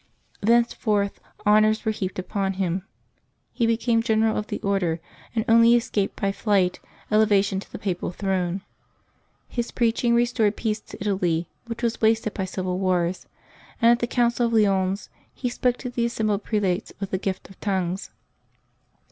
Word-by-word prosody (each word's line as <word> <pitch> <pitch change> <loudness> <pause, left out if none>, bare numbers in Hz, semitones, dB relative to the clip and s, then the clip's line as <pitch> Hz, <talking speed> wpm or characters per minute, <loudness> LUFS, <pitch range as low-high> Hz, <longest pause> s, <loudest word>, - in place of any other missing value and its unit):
Thenceforth 215 -2 +2 0.3
honors 215 +1 +4
were 220 - +2
heaped 190 -3 -4
upon 195 +1 -2
him; 185 -1 -1 0.7
he 235 - 0
became 230 0 +2
general 220 -1 +2
of 210 - -2
the - - -4
Order, 185 -5 0 0.4
and 220 0 0
only 230 +1 +6
escaped 215 -4 -1
by 195 - +1
flight 195 -3 +1 0.3
elevation 205 -2 +3
to - - -12
the - - -6
Papal 185 -3 -2
throne. 185 0 -1 0.9
His 240 -1 -3
preaching 235 0 +1
restored 235 -3 +2
peace 215 -1 -1
to - - -11
Italy, 180 -5 0 0.2
which 235 +1 -6
was 235 -1 -1
wasted 220 -1 +2
by 190 - -2
civil 185 0 -3
wars; 180 -1 0 0.5
and 230 +1 +6
at 240 - +3
the 240 - -1
Council 240 -1 +2
of 230 - -3
Lyons, 195 -2 +2 0.2
he 250 - -2
spoke 245 0 0
to 250 - -5
the 235 -1 0
assembled 215 -3 -1
prelates 205 -2 -1
with 195 -1 -4
the 190 - 0
gift 190 0 -4
of 195 - -17
tongues. 190 -2 -2
210 Hz, 160 wpm, -24 LUFS, 190-230 Hz, 0.9 s, only